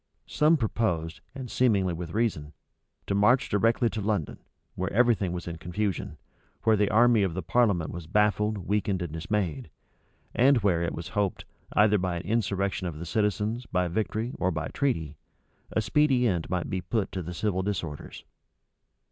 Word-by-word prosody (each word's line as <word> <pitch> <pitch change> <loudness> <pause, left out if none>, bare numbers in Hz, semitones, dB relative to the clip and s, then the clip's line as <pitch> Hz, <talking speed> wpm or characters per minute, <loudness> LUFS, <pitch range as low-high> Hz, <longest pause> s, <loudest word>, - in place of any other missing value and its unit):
Some 155 +2 +3
proposed, 90 - -1
and 130 -3 -7
seemingly 100 -8 +2
with 85 +1 -6
reason, 90 -10 -1 0.5
to - - -2
march 110 +6 +3
directly 115 +3 +2
to 110 - -3
London, 100 -7 -2 0.3
where 95 +1 -3
every 120 +2 +4
thing 95 -4 -2
was 85 -1 -5
in 85 -1 -5
confusion, 95 +4 -3 0.5
where 110 -1 +4
the 105 -1 +2
army 120 +1 +5
of 95 -4 0
the 95 - -3
parliament 100 -5 +2
was 85 -2 -7
baffled, 105 +2 +2
weakened, 100 -1 -1
and 80 -3 -6
dismayed, 80 -4 -2 0.6
and 135 +2 +5
where, 90 -5 +2
it 85 - -2
was 85 - -6
hoped, 105 -4 -1 0.3
either 105 -1 +4
by 90 -1 -1
an 85 - -4
insurrection 100 -2 -1
of 80 -3 -5
the 85 - -6
citizens, 105 +5 -1
by 90 -1 0
victory, 110 +5 -2
or 95 - +2
by 80 -2 -3
treaty, 80 - -1 0.5
a 110 - +1
speedy 130 +3 +3
end 90 -6 -1
might 90 -2 -1
be 95 - -2
put 110 -2 -2
to 95 - -3
the 90 +1 -6
civil 95 -1 0
disorders. 85 -7 -5
100 Hz, 175 wpm, -27 LUFS, 85-110 Hz, 0.6 s, army